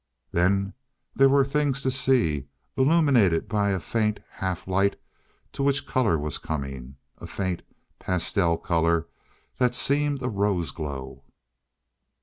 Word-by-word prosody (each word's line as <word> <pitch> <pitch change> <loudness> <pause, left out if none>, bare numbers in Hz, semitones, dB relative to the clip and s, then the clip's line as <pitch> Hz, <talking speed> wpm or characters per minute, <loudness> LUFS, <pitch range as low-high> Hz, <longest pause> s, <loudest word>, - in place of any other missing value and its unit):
Then 95 +3 +1 0.4
there 135 0 +5
were 140 0 +4
things 140 -1 0
to 130 - +1
see, 125 - +1 0.3
illumined 130 - +3
by 105 -1 +1
a 95 -1 0
faint 105 +5 -1
half 95 -2 -4
light 95 +1 +1 0.5
to - - -5
which 140 0 +1
color 115 -13 +1
was 75 -1 -3
coming; 70 -3 -5 0.2
a - - -8
faint, 95 -3 -3 0.4
pastel 90 -1 +1
color 85 -1 +1 0.5
that 125 -1 +2
seemed 145 0 +1
a - - 0
rose 100 - 0
glow. 70 -3 -7
100 Hz, 130 wpm, -25 LUFS, 85-130 Hz, 0.5 s, there